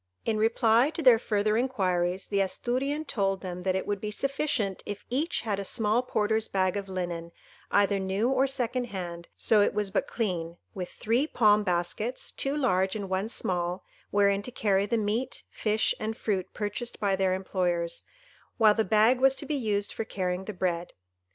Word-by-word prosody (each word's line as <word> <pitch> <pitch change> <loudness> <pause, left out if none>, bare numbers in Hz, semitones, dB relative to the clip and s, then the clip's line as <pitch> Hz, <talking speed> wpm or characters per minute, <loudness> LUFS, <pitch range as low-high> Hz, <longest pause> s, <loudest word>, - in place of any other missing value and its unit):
In 220 - +1
reply 225 +3 +3
to 325 - -3
their 245 -4 +7
further 215 -1 +1
inquiries, 190 -7 0
the 200 -1 0
Asturian 260 +10 -1
told 195 -7 -1
them 180 -1 -5
that 185 0 0
it 190 - -1
would 205 -2 -2
be 210 - -3
sufficient 270 -5 -1
if 205 - -7
each 300 +7 0
had 205 -4 -2
a - - -2
small 215 +4 +1
porter's 220 -2 0
bag 185 -1 +1
of 200 -1 -4
linen, 175 -2 -4 0.4
either 200 0 +3
new 190 +4 0
or 270 +1 +3
second 255 -2 0
hand, 175 -5 -6
so 215 -2 +4
it 205 - +2
was 210 -2 0
but - - 0
clean, 175 -7 -2 0.2
with 185 -4 -5
three 240 +7 0
palm 215 -7 +4
baskets, 180 +6 -1
two 275 +2 -1
large 190 -9 +1
and 200 -3 -4
one 190 +3 0
small, 180 -3 -2 0.3
wherein 200 -1 +3
to 205 - -6
carry 200 -4 +1
the 230 - +1
meat, 220 +5 -2
fish, 215 0 +1
and 220 +1 -3
fruit 195 -4 -2
purchased 210 +3 -4
by 200 -2 +2
their 190 -1 +1
employers, 175 -3 -2 0.5
while 220 -2 +6
the 220 - +1
bag 220 +5 +4
was 270 +1 +5
to - - -5
be 305 - -2
used 210 -7 -1
for - - -3
carrying 185 -3 -3
the 215 - -4
bread. 175 -2 -2
205 Hz, 185 wpm, -28 LUFS, 190-230 Hz, 0.5 s, their